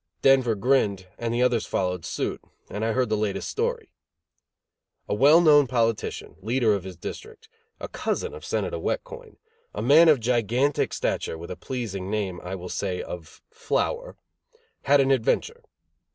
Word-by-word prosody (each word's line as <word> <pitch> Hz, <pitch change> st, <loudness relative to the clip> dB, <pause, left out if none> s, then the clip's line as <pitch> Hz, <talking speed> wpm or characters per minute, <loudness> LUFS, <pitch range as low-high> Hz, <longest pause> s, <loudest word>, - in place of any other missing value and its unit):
Denver 130 Hz, -4 st, +4 dB
grinned, 100 Hz, -4 st, +1 dB
and 115 Hz, -1 st, -2 dB
the 120 Hz, +1 st, +1 dB
others 120 Hz, -3 st, +1 dB
followed 90 Hz, -2 st, -2 dB
suit, -, -, -3 dB, 0.3 s
and 105 Hz, +2 st, -4 dB
I 115 Hz, 0 st, +1 dB
heard 130 Hz, -1 st, +1 dB
the 110 Hz, -, +1 dB
latest 105 Hz, -2 st, -2 dB
story. 465 Hz, -1 st, -2 dB, 1.2 s
A -, -, -1 dB
well 140 Hz, +9 st, +6 dB
known 145 Hz, -4 st, +6 dB
politician, 115 Hz, -3 st, -1 dB
leader 115 Hz, +1 st, +1 dB
of 100 Hz, -3 st, -2 dB
his 95 Hz, -2 st, -8 dB
district, 445 Hz, -, -9 dB, 0.3 s
a -, -, -5 dB
cousin 460 Hz, 0 st, -3 dB
of 460 Hz, -, -10 dB
Senator -, -, -2 dB
Wet -, -, -1 dB
Coin; 475 Hz, -2 st, -12 dB, 0.4 s
a -, -, -3 dB
man 155 Hz, +6 st, +7 dB
of 150 Hz, -4 st, +5 dB
gigantic 120 Hz, +4 st, +1 dB
stature, 80 Hz, -, -2 dB
with 85 Hz, +1 st, -9 dB
the -, -, -4 dB
pleasing 100 Hz, -7 st, -5 dB
name, 100 Hz, -4 st, -2 dB
I 90 Hz, +2 st, -4 dB
will 90 Hz, -1 st, -7 dB
say, 95 Hz, -1 st, -3 dB
of 85 Hz, -3 st, -9 dB
Flower, 475 Hz, +2 st, -2 dB, 0.7 s
had 140 Hz, -, +3 dB
had 145 Hz, -, +7 dB
an 135 Hz, 0 st, +2 dB
adventure. 135 Hz, -, 0 dB
120 Hz, 165 wpm, -25 LUFS, 100-150 Hz, 1.2 s, man